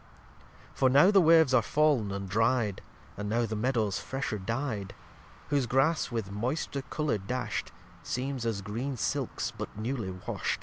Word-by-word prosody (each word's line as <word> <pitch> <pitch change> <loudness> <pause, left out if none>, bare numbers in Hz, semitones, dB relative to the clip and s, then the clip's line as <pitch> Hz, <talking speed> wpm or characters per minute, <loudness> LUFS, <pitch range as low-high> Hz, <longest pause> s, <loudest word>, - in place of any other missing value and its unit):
lxxix - - -25 0.3
For 130 - +5
now 145 +9 +6
the 195 -2 +6
Waves 160 -4 +6
are 130 - +6
fal'n 140 -5 +2
and 100 0 -4
dry'd, 110 +1 +1 0.4
And 105 0 -4
now 120 +2 +1
the 110 0 -3
Meadows 110 -3 0
fresher 130 -5 -3
dy'd; 110 -1 -3 0.5
Whose 140 -4 +1
Grass, 135 +6 +2
with 110 -4 -3
moister 130 +6 -2
colour 150 -4 -1
dasht, 125 +7 -3 0.3
Seems 130 0 -3
as 110 -4 -2
green 125 +7 -3
Silks - - -2
but - - -7
newly 110 -2 -3
washt. 90 -1 -3
120 Hz, 160 wpm, -29 LUFS, 105-140 Hz, 0.5 s, now